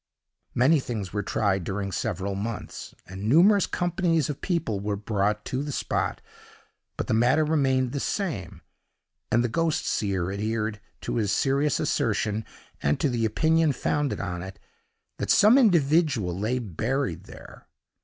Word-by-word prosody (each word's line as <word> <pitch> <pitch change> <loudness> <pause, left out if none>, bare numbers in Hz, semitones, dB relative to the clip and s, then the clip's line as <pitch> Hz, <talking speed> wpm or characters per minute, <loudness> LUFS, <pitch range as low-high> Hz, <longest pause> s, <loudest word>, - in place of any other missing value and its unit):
Many 140 +6 +4
things 105 -8 -5
were 105 - 0
tried 95 -1 0
during 100 +2 -3
several 100 -1 -2
months, 105 +3 -6
and 95 +4 -5
numerous 190 - +5
companies 175 -4 0
of 140 - -9
people 165 - -1
were 100 +1 -2
brought 105 0 -1
to 130 - -2
the 145 0 -4
spot, - - -2 0.8
but - - -2
the - - -1
matter 125 +7 +3
remained 135 -5 +1
the 140 - -3
same, 145 - -3 0.7
and 120 +2 +3
the - - +1
ghost 165 +6 0
seer 95 -3 -1
adhered 105 +1 -2 0.2
to - - -3
his 105 -4 +1
serious 140 +5 +1
assertion, 105 +1 0 0.4
and 75 +1 +1
to 145 - +1
the 120 -2 0
opinion 160 +7 +2
founded 145 +2 -1
on 90 -4 -4
it, 95 +1 -8 0.6
that - - -3
some 215 +4 +6
individual 155 - +3
lay 110 +7 -1
buried 115 - -2
there. - - -13
115 Hz, 150 wpm, -26 LUFS, 100-150 Hz, 0.8 s, some